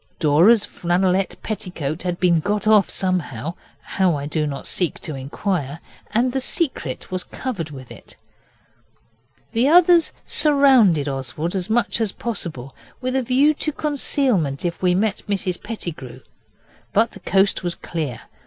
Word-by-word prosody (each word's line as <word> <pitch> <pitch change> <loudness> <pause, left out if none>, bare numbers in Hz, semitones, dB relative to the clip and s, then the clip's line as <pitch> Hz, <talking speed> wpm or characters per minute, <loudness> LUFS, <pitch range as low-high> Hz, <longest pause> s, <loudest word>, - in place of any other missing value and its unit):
Dora's 175 +9 +4
flannelette 185 +2 0
petticoat 175 -7 -4
had 180 -1 -3
been 175 -3 +3
got 205 +5 -2
off 215 -3 +5
somehow 165 - -2 0.3
how 185 -4 0
I 140 -1 -4
do 150 +1 -1
not 140 -1 -5
seek 180 -3 -1
to 155 - -5
inquire 145 +2 -3 0.3
and 240 +4 +1
the 265 - -1
Secret 260 - -2
was 185 -1 -2
covered 200 - -5
with 130 -3 -11
it. - - -13 1.4
The 235 +3 +2
others 345 +1 +5
surrounded 260 - +4
Oswald 135 +5 -3
as 185 0 -2
much 235 +1 +1
as 215 -4 +1
possible, 160 - -4 0.3
with 255 0 -2
a 265 - +2
view 265 +5 +3
to 305 +1 -3
concealment 255 - 0
if 170 -1 -3
we 180 -1 +3
met 205 +1 0
Mrs 190 -3 -1
Pettigrew. 155 - -7 0.7
But 225 +2 +3
the - - -12
coast 195 +2 +2
was 175 -2 -2
clear. 155 -8 -5
185 Hz, 145 wpm, -21 LUFS, 155-230 Hz, 1.4 s, off